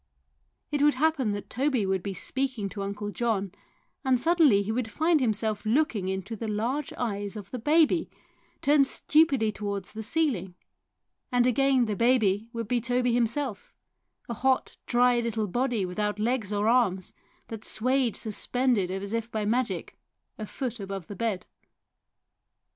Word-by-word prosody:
It 290 -1 0
would 295 -1 +4
happen 280 -5 +1
that 205 -1 -5
Toby 260 -3 0
would 190 -1 0
be 195 +1 -5
speaking 255 -1 -2
to 200 - -6
Uncle 205 +1 -4
John, 205 -5 -1 0.5
and 260 -2 +3
suddenly 300 -9 +4
he 205 - -3
would 230 0 -2
find 320 +6 +2
himself 215 -3 0
looking 225 -4 +1
into 190 +4 -3
the 225 +1 -5
large 235 +7 -2
eyes 205 -3 -3
of 205 -3 -9
the 250 - -4
baby, 320 +5 +3 0.5
turned 285 -1 +4
stupidly 275 -10 +3
towards 200 -2 -5
the 220 - -5
ceiling, 220 - -1 0.8
and 245 -1 +3
again 260 0 +3
the 215 -2 -2
baby 225 -2 +2
would 230 -2 -4
be 240 +1 +1
Toby 245 0 +1
himself, 240 0 -1 0.5
a 235 - -3
hot, 260 +3 0
dry 245 0 +4
little 230 -2 -1
body 240 0 0
without 210 +3 -2
legs 220 -1 -1
or 205 +1 0
arms, 215 -7 +2 0.4
that 220 -1 -7
swayed 255 0 +1
suspended 230 -2 0
as 195 +2 -4
if 230 0 -2
by 215 -1 -2
magic 245 +3 -1 0.4
a 215 - -5
foot 245 -1 -4
above 195 -3 -5
the 205 - -8
bed. 205 -3 -2
230 Hz, 155 wpm, -27 LUFS, 205-255 Hz, 0.8 s, would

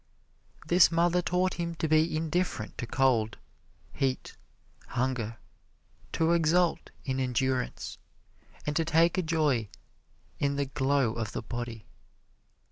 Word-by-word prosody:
This 175 0 +6
mother 175 +1 +3
taught 180 +1 +1
him 170 -1 -2
to 160 - -1
be 155 +1 +3
indifferent 160 -8 -2
to 120 - -3
cold, 120 -4 +2 0.6
heat, 130 -1 -2 0.5
hunger, 120 -3 -2 0.8
to 165 +1 +2
exult 170 +1 +2 0.2
in 130 -2 -1
endurance, 130 0 -1 0.7
and 150 - -1
to 165 - +2
take 165 +2 +3
a - - +3
joy 150 - +1 0.7
in 140 0 +1
the 140 0 0
glow 135 -3 +1
of 115 -2 -4
the - - -4
body. 120 -1 -6
145 Hz, 125 wpm, -29 LUFS, 125-165 Hz, 0.8 s, This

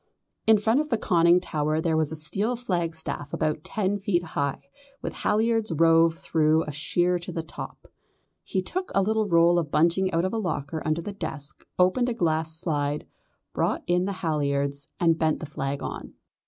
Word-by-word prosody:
In 220 -1 +7
front 225 +5 +2
of 305 0 -1
the 230 - +2
conning 170 -2 +4
tower 155 -3 -1
there 160 0 +1
was 160 -1 +1
a - - -3
steel 195 +10 0
flagstaff 170 - -3
about 155 -1 -1
ten 205 -1 -1
feet 185 -3 0
high, 140 -4 -2 0.4
with - - -3
halliards 225 -1 +1
rove 165 +1 +4
through 160 -1 +2
a 150 - -5
sheer 175 +5 +1
in 175 0 -7
the 165 - -2
top. 155 - -9 0.6
He 190 - -2
took 370 - -3
a 195 - +4
little 215 +1 +1
roll 170 0 +5
of 160 -4 -3
bunting 170 +5 +2
out 170 +2 +1
of 185 - -2
a 225 - 0
locker 160 -5 -3
under 155 +2 0
the 205 - -5
desk, 155 -6 -5
opened 185 +8 +3
a 235 - -2
glass 160 -4 0
slide, 145 -3 -1 0.5
brought - - 0
in 180 +1 +2
the 200 - -2
halliards 140 -2 0
and 165 -2 +3
bent 160 -1 +1
the - - -5
flag 140 -2 -4
on. - - -6
165 Hz, 185 wpm, -26 LUFS, 155-190 Hz, 0.6 s, In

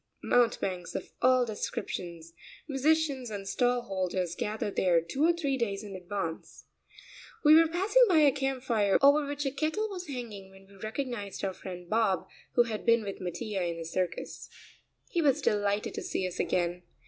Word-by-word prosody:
Mountebanks 195 -7 +1
of - - -5
all 255 0 +5
descriptions, 175 -7 -5 0.3
musicians, 280 -2 +1
and 200 -2 -6
stall 245 +2 +1
holders 185 -4 -2
gather 210 +1 -2
there 180 -3 +3
two 215 - -2
or 335 - +6
three 290 -6 -1
days 200 -3 -2
in 200 -2 -8
advance. 180 -3 -5 0.8
We 300 0 +8
were 325 +1 +7
passing 390 +9 +3
by 350 - +4
a 290 -2 +6
camp 270 -2 -2
fire 215 -6 +3
over 285 +1 +6
which 285 0 -3
a 270 - 0
kettle 315 +10 -1
was 365 -2 -6
hanging 230 -8 -7
when 195 0 -17
we 200 - -20
recognized 215 -1 -5
our 190 - -2
friend 180 -1 -8
Bob, 210 -3 +1 0.3
who 240 - +6
had 220 -3 -5
been 230 -1 +4
with 200 -2 -6
Mattia 185 +3 -3
in 170 -1 -2
the 165 - -6
circus. 180 +1 -3 0.6
He 345 - 0
was 280 -4 +3
delighted 205 - 0
to 425 - -4
see 355 - -2
us 180 - -7
again. 175 0 0
220 Hz, 175 wpm, -29 LUFS, 190-275 Hz, 0.8 s, We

